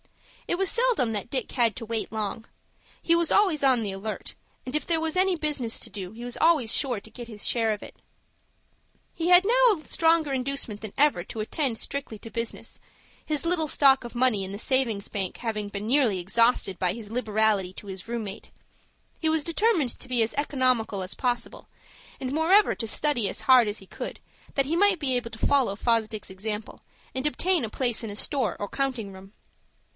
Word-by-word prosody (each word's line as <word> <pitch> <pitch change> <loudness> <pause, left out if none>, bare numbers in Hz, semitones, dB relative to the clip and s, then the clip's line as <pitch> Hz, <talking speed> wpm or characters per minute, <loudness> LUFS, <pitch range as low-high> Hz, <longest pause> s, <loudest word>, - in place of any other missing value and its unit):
It 345 - 0
was 385 0 +1
seldom 470 - +2
that 210 +2 -3
Dick 260 -1 -2
had 230 -5 +2
to 225 - -6
wait 225 0 -3
long. 220 +1 -3 0.6
He 335 - +3
was 340 -1 +2
always 370 -8 +3
on 255 -4 +4
the 205 - -2
alert, 205 +3 -5 0.3
and 255 +3 -5
if 300 - -1
there 330 -2 +1
was 320 +1 -1
any 370 -1 +3
business 290 -7 -2
to - - -4
do 190 -2 -6
he 235 +2 -9
was 245 - -3
always 310 -9 +4
sure 250 -6 +1
to 220 - -15
get 235 +2 -9
his 210 -2 -4
share 225 -2 +2
of 210 - -3
it. - - -13 1.1
He 335 +1 -2
had 360 +1 +7
now 480 -4 +4
a 305 - -16
stronger 325 -3 +2
inducement 260 -5 -2
than 215 -2 -6
ever 285 -11 +3
to 220 - -7
attend 235 +2 -1
strictly 275 -5 -4
to 225 - -10
business; 230 0 -5 0.4
his 305 +1 -2
little 335 -2 +1
stock 275 -2 +5
of 240 0 -9
money 240 -5 +2
in 190 - -5
the 200 - -5
savings 230 -4 0
bank 195 -3 -4
having 215 -3 -3
been 205 +1 -5
nearly 245 -6 +3
exhausted 200 0 +2
by 180 -2 +1
his 220 -2 -9
liberality 215 -5 +1
to 205 - -11
his 190 0 -8
room 235 -1 -2
mate. 195 - -9 0.7
He 320 - +1
determined 335 - +1
to 255 - -7
be 245 -2 +2
as 220 - -2
economical 255 -8 0
as 185 - -6
possible, 245 -2 -3 0.5
and 260 0 -3
moreover 360 +7 +4
to 225 - -3
study 245 -4 +1
as - - -3
hard 255 -4 +6
as 205 - -4
he 195 - -13
could, - - -7 0.4
that 275 - +2
he 310 +5 -1
might 395 0 +4
be 270 -4 0
able 240 -2 -2
to 225 - -10
follow 265 -8 +2
Fosdick's 220 -3 0
example, 210 +3 -5 0.3
and 260 +2 -2
obtain 355 +2 +1
a 225 - -2
place 240 0 -1
in 225 - -4
a 205 - -6
store 255 - 0
or 205 - -3
counting 245 -6 -3
room. 190 +1 -13
240 Hz, 205 wpm, -26 LUFS, 215-295 Hz, 1.1 s, had